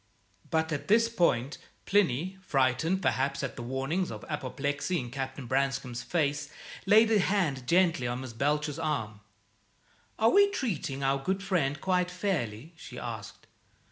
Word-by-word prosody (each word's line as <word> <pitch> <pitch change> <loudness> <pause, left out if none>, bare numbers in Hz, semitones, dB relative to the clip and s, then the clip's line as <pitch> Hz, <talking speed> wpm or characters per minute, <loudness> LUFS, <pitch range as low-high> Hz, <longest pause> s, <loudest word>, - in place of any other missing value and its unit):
But 160 0 0
at 150 - -3
this 230 +3 +5
point 150 - +1 0.3
Plinny, 185 -1 +1
frightened 145 +4 +1
perhaps 135 +2 0
at 135 - -3
the - - -7
warnings 135 +9 -2
of - - -7
apoplexy 145 +3 -2
in 120 -3 -6
Captain 135 0 -5
Branscome's 135 -1 -1
face, 145 -1 -1 0.4
laid 220 +3 +6
a 215 - +5
hand 170 -10 0
gently 170 -7 +3
on 120 +1 -3
Miss 130 -3 -7
Belcher's 150 +4 0
arm. 120 -10 -2 1.0
"Are 225 +1 +4
we 405 0 +6
treating 170 - -3
our 135 0 +1
good 190 +3 -1
friend 155 -8 0
quite 180 0 +1
fairly?" 165 - -3
she 125 -6 -10
asked. 115 -4 -7
145 Hz, 145 wpm, -29 LUFS, 130-185 Hz, 1.0 s, laid